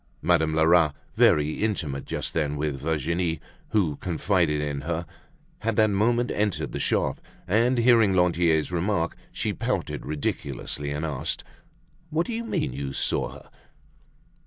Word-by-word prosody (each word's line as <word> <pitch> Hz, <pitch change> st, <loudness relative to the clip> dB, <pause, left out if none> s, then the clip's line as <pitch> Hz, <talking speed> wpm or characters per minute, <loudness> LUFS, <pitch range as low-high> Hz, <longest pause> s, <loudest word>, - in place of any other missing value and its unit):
Madame 80 Hz, -2 st, +3 dB
Lerat, 80 Hz, -1 st, +4 dB, 0.2 s
very 75 Hz, +1 st, +3 dB
intimate 80 Hz, -11 st, -2 dB
just -, -, -3 dB
then 75 Hz, -3 st, 0 dB
with 70 Hz, -2 st, -2 dB
Virginie, 80 Hz, +2 st, 0 dB, 0.3 s
who 85 Hz, -10 st, +1 dB
confided 85 Hz, -3 st, +1 dB
in 70 Hz, -1 st, -2 dB
her, 85 Hz, +3 st, -2 dB, 0.5 s
had 115 Hz, 0 st, -1 dB
that 110 Hz, -1 st, +4 dB
moment 120 Hz, +5 st, +2 dB
entered 105 Hz, -2 st, -1 dB
the -, -, -4 dB
shop, -, -, 0 dB, 0.3 s
and 115 Hz, +6 st, +3 dB
hearing 115 Hz, -5 st, +5 dB
Lantier's 85 Hz, -3 st, +2 dB
remark, 90 Hz, -1 st, 0 dB, 0.2 s
she -, -, -2 dB
pouted -, -, -2 dB
ridiculously, 70 Hz, -1 st, -3 dB
and 75 Hz, +2 st, -2 dB
asked: 75 Hz, -5 st, -3 dB, 0.7 s
"What 160 Hz, +2 st, 0 dB
do 240 Hz, -, -4 dB
you 230 Hz, +1 st, -2 dB
mean, 225 Hz, -, -1 dB
you 70 Hz, 0 st, -4 dB
saw -, -, 0 dB
her?" -, -, -13 dB
85 Hz, 140 wpm, -26 LUFS, 75-105 Hz, 0.7 s, hearing